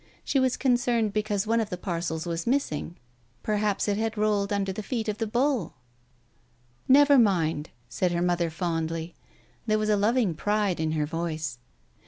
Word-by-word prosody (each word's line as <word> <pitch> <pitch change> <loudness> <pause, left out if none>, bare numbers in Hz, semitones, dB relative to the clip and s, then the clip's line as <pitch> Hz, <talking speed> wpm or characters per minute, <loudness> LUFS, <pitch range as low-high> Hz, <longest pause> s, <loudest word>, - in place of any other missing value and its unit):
NShe 270 - +2
was 260 -1 +1
concerned 240 -4 +1
because 210 -1 -1
one 230 +2 +2
of 220 -2 -1
the 180 - -4
parcels 170 -3 -3
was 170 +2 -3
missing. 210 - -1 0.5
Perhaps 210 -1 0
it 205 -1 +1
had 225 0 -2
rolled 210 -1 +1
under 195 -1 0
the 215 - -5
feet 225 +1 -3
of 210 0 -2
the 225 - -1
bull?... 245 - 0 1.1
v 260 - +5
"Never 285 -1 +7
mind," 165 -8 +1 0.2
said 180 +9 -1
her 170 0 0
mother 175 -1 +1
fondly. 165 0 -3 0.5
There 215 0 +3
was 215 0 -1
a 210 - +4
loving 210 -1 +2
pride 205 +2 0
in 160 0 0
her 150 -1 0
voice. 155 -5 -4
200 Hz, 175 wpm, -27 LUFS, 170-225 Hz, 1.1 s, Never